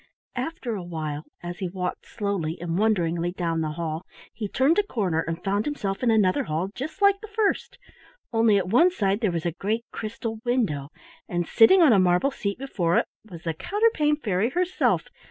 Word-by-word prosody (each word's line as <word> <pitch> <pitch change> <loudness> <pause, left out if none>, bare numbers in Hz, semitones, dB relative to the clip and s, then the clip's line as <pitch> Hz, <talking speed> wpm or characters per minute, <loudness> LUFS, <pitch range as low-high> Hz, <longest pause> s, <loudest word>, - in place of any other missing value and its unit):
After 255 -2 -3
a 200 - -3
while, 155 -3 -5 0.2
as 175 0 -6
he 185 - -2
walked 180 0 -4
slowly 195 -7 -2
and 170 -1 -3
wonderingly 175 -5 +1
down 165 -3 -1
the 155 -1 -2
hall, 160 +1 -3 0.3
he 210 -1 -4
turned 275 - +3
a - - +3
corner 195 - -1
and 165 +1 -5
found 200 +2 0
himself 200 -10 -3
in 250 - +2
another 210 -5 +3
hall 165 +5 -2
just 310 - -5
like 400 0 +5
the 435 - -8
first, 430 +1 -1 0.6
only 225 -2 +4
at 185 -2 0
one 285 - +5
side 200 - 0
there 215 - +2
was 170 -2 -3
a 170 - +1
great 215 +7 -2
crystal 225 0 -5
window, 210 - 0 0.4
and 175 -1 -1
sitting 350 +11 +6
on 285 -8 +7
a 200 - +5
marble 180 +9 +3
seat 200 -6 -3
before 180 -10 0
it - - +3 0.2
was 170 -3 -10
the 165 -2 -1
Counterpane 395 - +2
Fairy 215 -6 0
herself. 360 +6 +1
200 Hz, 190 wpm, -25 LUFS, 175-255 Hz, 0.6 s, on